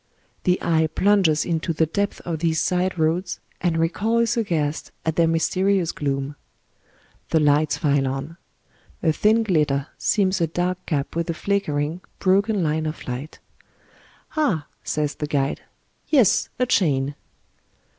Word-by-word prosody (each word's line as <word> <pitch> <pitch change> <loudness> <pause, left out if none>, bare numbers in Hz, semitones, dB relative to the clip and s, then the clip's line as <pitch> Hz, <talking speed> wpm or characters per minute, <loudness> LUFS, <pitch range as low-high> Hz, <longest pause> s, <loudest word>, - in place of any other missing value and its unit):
The 180 0 +3
eye 160 -2 +2
plunges 185 -3 +3
into 165 0 -1
the 160 +1 +2
depths 200 +6 -2
of 165 -3 -4
these 160 -1 +1
side 180 0 0
roads, 170 +3 0 0.2
and 175 -2 +1
recoils 220 +8 +1
aghast 160 -10 -1
at 160 -1 0
their 170 -1 +4
mysterious 185 +2 +1
gloom. 140 0 -3 0.9
The 160 - +3
lights 150 0 +3
file 140 -3 +1
on. 135 +5 -4 0.7
A 160 - +4
thin 220 +6 +3
glitter 150 -8 +1
seams 190 -3 +1
a 165 - +3
dark 180 +3 -2
gap 145 -3 -2
with 170 +1 -1
a 165 - -1
flickering, 165 -4 -1 0.2
broken 200 +1 +2
line 155 0 0
of 155 - -6
light 130 +5 -5 0.5
" - - -28
Ah," 210 - +1 0.2
says 150 -1 -1
the 150 - -4
guide. 140 -2 -1 0.3
" - - -41
Yes, 260 - +4
a 250 - +2
chain 145 - +1
165 Hz, 145 wpm, -23 LUFS, 150-185 Hz, 0.9 s, their